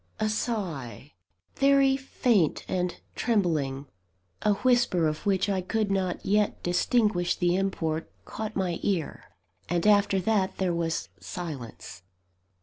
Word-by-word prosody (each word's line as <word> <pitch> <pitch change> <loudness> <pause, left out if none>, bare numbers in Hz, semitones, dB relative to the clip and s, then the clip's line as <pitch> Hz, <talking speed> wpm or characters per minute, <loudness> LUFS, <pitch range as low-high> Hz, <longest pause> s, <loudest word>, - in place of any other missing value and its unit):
A 215 0 +1
sigh, 160 - -3 0.4
very 275 -1 +4
faint 240 - +1
and 180 -1 -2
trembling; 155 - 0 0.6
a 210 - +3
whisper 240 -7 +2
of 155 +5 -2
which 190 0 +2
I 195 -2 0
could 210 +2 -1
not 190 -2 -1
yet 210 +1 +1
distinguish 180 0 +2
the 175 -1 +1
import, 165 -5 -2
caught 215 0 -5
my 180 -3 -1
ear 180 -7 -2 0.4
and 175 0 0
after 205 -2 +4
that, 195 -1 0
there 185 -2 0
was 165 -1 -2
silence. 140 - -7
190 Hz, 125 wpm, -27 LUFS, 170-210 Hz, 0.6 s, very